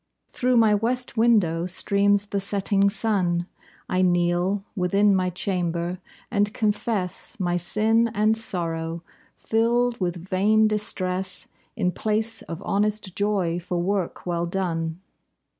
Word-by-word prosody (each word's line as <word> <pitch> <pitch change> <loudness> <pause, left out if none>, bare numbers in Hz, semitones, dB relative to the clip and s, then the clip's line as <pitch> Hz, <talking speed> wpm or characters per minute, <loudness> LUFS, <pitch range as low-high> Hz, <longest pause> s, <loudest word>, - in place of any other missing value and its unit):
Through 250 0 +1
my 220 -2 +5
west 240 +5 -1
window 200 -8 +3
streams 200 +2 +2
the 200 -1 -2
setting 200 0 +1
sun. 190 -5 0 0.4
I 185 - +1
kneel 175 +2 +1
within 195 +2 +3
my 185 -1 +1
chamber, 175 -1 -2 0.3
and 205 -2 +1
confess 210 -3 -2
My 175 -2 0
sin 220 +6 +2
and 215 +2 +3
sorrow, 165 -5 -3 0.3
filled 235 +2 +1
with 175 0 -3
vain 215 +3 +3
distress, 190 -3 -2 0.3
In 185 -6 0
place 220 +3 -2
of 170 +4 -8
honest 205 -1 -1
joy 195 -5 0
for 175 0 -4
work 190 0 -2
well 170 -1 -1
done. 170 -2 -2
195 Hz, 125 wpm, -24 LUFS, 175-215 Hz, 0.4 s, my